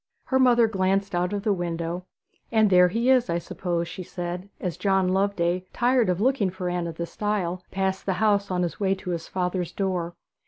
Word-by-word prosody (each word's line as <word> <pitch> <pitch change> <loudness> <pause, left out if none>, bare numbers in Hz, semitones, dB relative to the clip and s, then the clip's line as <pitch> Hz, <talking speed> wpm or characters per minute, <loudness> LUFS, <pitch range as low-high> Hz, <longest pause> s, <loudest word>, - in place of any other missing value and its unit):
Her 265 - +1
mother 240 -2 +5
glanced 195 -1 0
out 175 +1 0
of 205 -1 -3
the 215 -2 +2
window. 175 0 -3 0.4
'And 220 -3 +4
there 180 0 +7
he 230 +7 +2
is, 250 -2 +3
I 170 - +1
suppose,' 170 0 -3
she 185 +2 -7
said, 180 +1 -5
as 180 -3 -3
John 190 -2 +2
Loveday, 185 -2 +1
tired 245 -3 +2
of 180 0 0
looking 235 -3 +2
for 180 0 -4
Anne 175 -1 -2
at 165 - -6
the 170 - -3
stile, 185 -2 -2
passed 190 0 -2
the 190 - +2
house 200 +1 +2
on 180 -1 0
his 170 - -3
way 195 -1 +2
to 185 -1 -6
his 170 -1 -4
father's 180 -1 -2
door. 180 -3 -2
185 Hz, 205 wpm, -25 LUFS, 175-205 Hz, 0.4 s, there